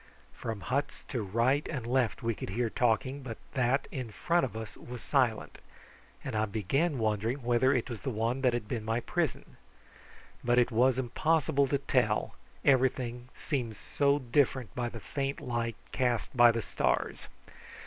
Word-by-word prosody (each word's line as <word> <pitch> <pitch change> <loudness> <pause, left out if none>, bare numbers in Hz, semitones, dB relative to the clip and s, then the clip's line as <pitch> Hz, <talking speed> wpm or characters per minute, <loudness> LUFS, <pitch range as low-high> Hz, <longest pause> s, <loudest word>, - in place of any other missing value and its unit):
From 110 -3 -5
huts 140 +6 -2
to 125 - -2
right 115 +8 +1
and 130 -8 -4
left 125 -3 0
we 115 0 +1
could - - -6
hear 115 +3 -1
talking, 125 +4 +1
but 120 -4 -6 0.2
that 130 +2 +1
in 130 -4 -4
front 170 +10 +1
of 115 -4 -3
us 110 -1 -6
was 120 -1 -9
silent, 125 -6 +1 0.6
and - - -4
I 110 0 +2
began 135 - 0
wondering 110 +4 0
whether 120 +2 +3
it 125 -3 +1
was 120 -5 -6
the - - -2
one 115 +3 -1
that 130 -2 +4
had 120 -3 -2
been 115 -1 -3
my 115 +2 0
prison. 165 -2 -2 0.9
But 120 0 +2
it 125 +1 +4
was 125 +3 +3
impossible 140 +2 +2
to 140 - +1
tell, 125 -6 +1 0.3
everything 125 -2 +2
seemed 125 -8 -2
so 140 +5 +1
different 130 -2 +1
in 120 -1 -1
the 115 - -8
faint 140 +5 -3
light 120 -5 -2 0.2
cast 125 -1 0
by 120 -1 +8
the 115 -1 -2
stars. - - -1
125 Hz, 170 wpm, -30 LUFS, 115-135 Hz, 0.9 s, by